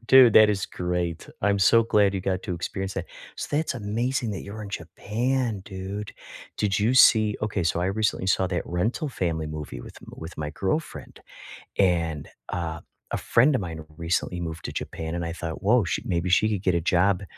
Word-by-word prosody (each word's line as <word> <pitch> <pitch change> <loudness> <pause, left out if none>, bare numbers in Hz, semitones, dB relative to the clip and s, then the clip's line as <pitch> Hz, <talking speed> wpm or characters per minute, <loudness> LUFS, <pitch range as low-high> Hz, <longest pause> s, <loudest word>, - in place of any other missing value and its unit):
Dude, 130 -4 +8
that 110 -1 +8
is 100 -2 0
great. 90 -2 -3
I'm 100 0 +3
so 115 +4 +6
glad 105 -3 +3
you 95 - -1
got 95 0 -1
to 90 - -2
experience 95 +3 -4
that - - -3 0.3
so - - -4
that's 155 -2 0
amazing 120 +3 -1
that 100 - -5
you 100 - -8
were 110 - -6
in 100 - -8
Japan, 115 +6 -2
dude. 100 +2 -6 0.4
Did 100 -1 +1
you 110 +5 +2
see 110 -4 +6
okay, 105 -4 -1
so 85 +1 +1
I 90 - +1
recently 100 -1 0
saw 95 0 +2
that 90 -1 -1
Rental 110 - -1
Family 80 -7 -2
movie 75 -5 -6
with - - -12 0.2
with 80 +2 -9
my 75 -1 -2
girlfriend, 95 - -3 0.6
and 85 -5 +1 0.2
a 85 -2 -3 0.3
a - - 0
friend 130 +5 +3
of 125 - 0
mine 80 -4 -6
recently 85 +1 -1
moved 80 -1 -5
to - - -3
Japan, 80 +1 -4
and 85 - -2
I 85 - -3
thought, 80 0 -6
"Whoa, 115 +3 +4
she 85 - -2
maybe 85 0 -1
she 100 +4 +4
could 105 -3 -1
get 90 - +2
a 85 - +1
job 90 +3 +2
95 Hz, 200 wpm, -25 LUFS, 85-110 Hz, 0.6 s, Dude